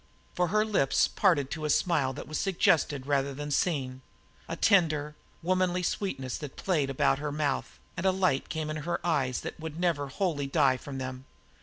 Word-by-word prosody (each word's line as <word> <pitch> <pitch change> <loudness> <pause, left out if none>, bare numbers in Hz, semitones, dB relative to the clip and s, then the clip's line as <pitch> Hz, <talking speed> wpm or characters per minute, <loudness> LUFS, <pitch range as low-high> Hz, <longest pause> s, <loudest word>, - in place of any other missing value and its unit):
For 180 0 +1
her 215 +4 +2
lips 195 -11 +2
parted 155 -9 +2
to 160 - -4
a 150 - -1
smile 150 -4 +2
that 140 - -8
was 155 - -3
suggested 155 -7 +2
rather 140 -1 0
than 145 +1 -5
seen, 135 -5 0 0.5
a 165 - -2
tender, 155 -6 +2 0.3
womanly 180 0 +1
sweetness 135 -10 -2
that 145 -3 -7
played 155 -8 0
about 135 0 +2
her 150 0 -3
mouth; 150 -1 -2 0.2
and 180 - -4
a - - +5
light 185 -8 +1
came 155 -1 -3
in 155 - -3
her 170 +3 -2
eyes 135 -7 +1
that - - -7
would 160 0 -6
never 165 -5 +1
wholly 145 -1 -1
die 135 -3 +3
from 135 +1 -7
them. 130 0 -5
150 Hz, 185 wpm, -29 LUFS, 135-175 Hz, 0.5 s, a